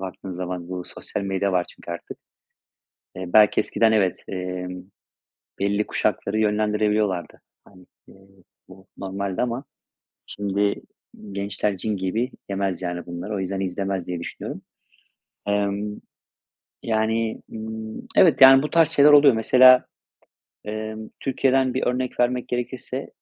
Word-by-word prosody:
Baktığın 95 0 -7
zaman, 90 -1 -5
bu 90 -1 -4
sosyal 105 - -5
medya 95 0 -1
var, 90 -1 +1
çünkü - - -11
artık. 85 - -7 1.0
Eee, 95 - -5
belki 105 -1 +6
eskiden 110 +1 +2
evet, 100 -5 +2
emm, 90 -1 -5 0.8
belli 100 +1 +1
kuşakları 105 +2 -1
yönlendirebiliyorlardı. 105 -3 0 0.2
Hani, 90 0 -19 0.2
iii, 95 -1 -20 0.2
bu 95 +1 -15
normaldi 95 0 -3
ama 125 +2 -2 0.6
şimdi 100 0 -1 0.6
gençler 100 0 -2
cin 105 +2 -2
gibi, 110 +7 -1 0.2
yemez 95 -2 -2
yani 90 -1 -4
bunları. 85 +5 -6
O - - -2
yüzden 95 +1 -3
izlemez 95 -1 -3
diye, 90 -1 -3
düşünüyorum. 85 - -7 0.9
Imm, 100 0 -1 0.8
yani, 110 0 0
ımm, 110 0 -7
evet, 165 -6 +5
yani, 135 +1 +9
bu 150 - -2
tarz 165 -2 +4
şeyler 150 -2 +6
oluyor. 145 -2 +7
Mesela, 125 +3 +6 0.8
emm, 110 +1 -5
Türkiye'den 130 -1 +1
bir 130 - -1
örnek 125 0 -2
vermek 125 0 +1
gerekirse; 125 +2 -4
105 Hz, 125 wpm, -23 LUFS, 95-115 Hz, 1.0 s, yani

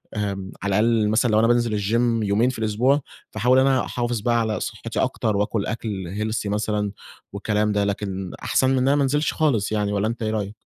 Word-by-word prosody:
آمم 100 -2 -3
على 100 0 +1
الأقل 110 -1 +2
مثلًا 115 +2 +2
لو 110 - +4
أنا 115 - +4
بانزل 120 -3 +2
الgym 115 +2 +1
يومين 110 +5 +2
في 125 - -6
الأسبوع 120 +7 +2 0.3
فاحاول 125 +4 +3
أنا 130 -1 +3
أحافظ 120 -1 -2
بقى 120 +2 +2
على 110 -2 -1
صحتي - - -5
أكتر 105 -2 0
وآكل 105 0 -1
أكْل 110 -1 -3 0.3
healthy 110 -1 -2
مثلًا 105 -1 -1 0.4
والكلام 105 +1 0
ده، 105 0 +1
لكن 95 -2 -3
أحسن 130 - +2
من 135 - +2
أنا 135 +2 +3
ما 145 - +2
انزلش 145 +3 +1
خالص 130 -11 +1
يعني 105 -1 0
والَّا 100 +1 0
أنت 115 0 -4
إيه 110 - -1
رأيك؟ 105 -1 -3
110 Hz, 200 wpm, -23 LUFS, 105-120 Hz, 0.4 s, لو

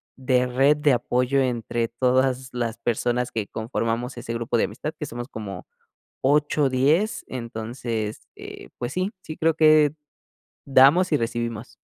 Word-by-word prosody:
de 130 -1 +1
red 135 +4 +3
de 150 -2 +3
apoyo 125 +2 +1
entre 120 -2 -1
todas 130 +1 +1
las 120 -2 -2
personas 120 +1 -1
que 110 -3 -3
conformamos 115 +2 -3
ese 115 -1 -5
grupo 115 0 -2
de - - +3
amistad 155 - -5
que 150 - -4
somos 120 +1 -6
como 100 -7 -7 0.5
8, 145 +1 +2
10. 150 - +1
Entonces, 115 -2 -5
eh, - - -10
pues 120 - -3
sí, 185 +3 -1
sí 155 - -8
creo 165 0 +2
que 155 -2 +5 0.7
damos 140 +7 +5
y - - +5
recibimos. 115 0 -4
125 Hz, 145 wpm, -24 LUFS, 115-140 Hz, 0.7 s, que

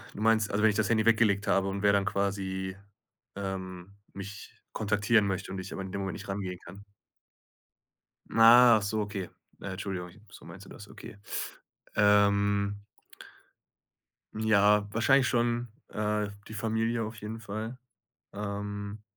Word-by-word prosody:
du - - -8
meinst, 110 -1 +3
also 105 +2 0
wenn 110 - +6
ich 105 - -3
das 110 -3 +1
Handy 110 -1 +2
weggelegt 110 -3 +3
habe 95 0 +2
und 100 +1 -3
wer 100 0 +5
dann 100 -1 +2
quasi, 95 -1 -2 0.6
ähm, 95 -1 -6 0.2
mich 100 +1 -9 0.2
kontaktieren 105 0 +2
möchte 95 0 -3
und 95 - -5
ich 95 +1 -7
aber - - -4
in 95 - -7
dem 100 0 -3
Moment 95 -3 -3
nicht - - -9
rangehen 95 -2 -4
kann. 100 +4 -12 1.5
Achso 115 -2 +6
okay. 100 -4 -4 0.3
Äh, 95 - -5
Entschuldigung, 95 -2 -5
ich 105 - -19
so - - -14
meinst - - -11
du - - -13
das. - - -11
Okay. 100 - -11 0.8
Ähm 100 0 +3 1.5
Ja, 105 -1 +3
wahrscheinlich 130 +4 +4
schon, 120 0 0 0.2
äh, 105 0 -1 0.2
die 110 - -9
Familie 115 +2 -1
auf 110 +1 -7
jeden 110 +2 -7
Fall. 110 +3 -5 0.6
Ähm, 105 0 -5
105 Hz, 145 wpm, -29 LUFS, 100-110 Hz, 1.5 s, wenn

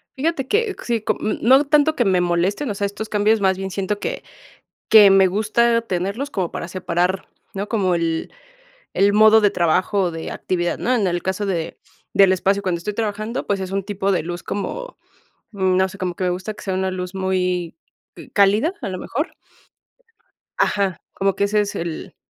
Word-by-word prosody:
Fíjate 280 -1 -1
que 420 - +1
q - - -11
sí, 230 -3 -1 0.2
mm, 215 - -1
no 265 +3 +6
tanto 300 +1 +3
que 245 - +1
me 185 -2 +3
molesten, 180 +9 0
o 205 - -3
sea, 200 - -1
estos 210 +2 -5
cambios 210 +1 +2
más 190 -1 +2
bien 190 0 -4
siento 200 +2 -2
que - - -4 0.7
que 210 -2 +9
me 195 0 +6
gusta 225 +4 +2
tenerlos 200 +6 -3
como 185 -9 -2
para - - -5
separar, 185 +1 -1 0.3
¿no?, 200 +1 -4
como 195 -6 +1
el 165 -1 -2 0.6
el 200 +1 +3
modo 215 +1 +6
de 205 - +4
trabajo 185 +3 +1
o 175 - 0
de 165 -1 -6
actividad, 175 -2 -2
¿no? 255 - 0
En 210 -5 +1
el 175 -1 -1
caso 190 +2 -2
de 170 -5 -3 0.4
del 195 -1 +6
espacio 195 +2 +1
cuando 180 -2 0
estoy 210 +5 -4
trabajando, 215 +2 -3
pues 200 -1 -1
es 190 -1 -5
un 195 0 -1
tipo 200 0 -1
de 180 -5 0
luz 175 +1 -5
como, - - -5 0.5
no 190 -2 +1
sé, 190 - -11
como 185 -2 -3
que 185 - -3
me 180 - +1
gusta 185 +4 -4
que 210 - -13
sea 190 - -2
una 190 0 -1
luz 180 0 -5
muy, 180 -2 -1 0.4
eh, - - -12
cálida, 210 - +3
a - - -3
lo 185 - -5
mejor. 290 - -3 1.3
Ajá, 195 -4 0
como 195 -1 0
que 200 - 0
ese 210 +1 +2
es 205 - -4
el 170 -1 -5
195 Hz, 200 wpm, -21 LUFS, 185-215 Hz, 1.3 s, que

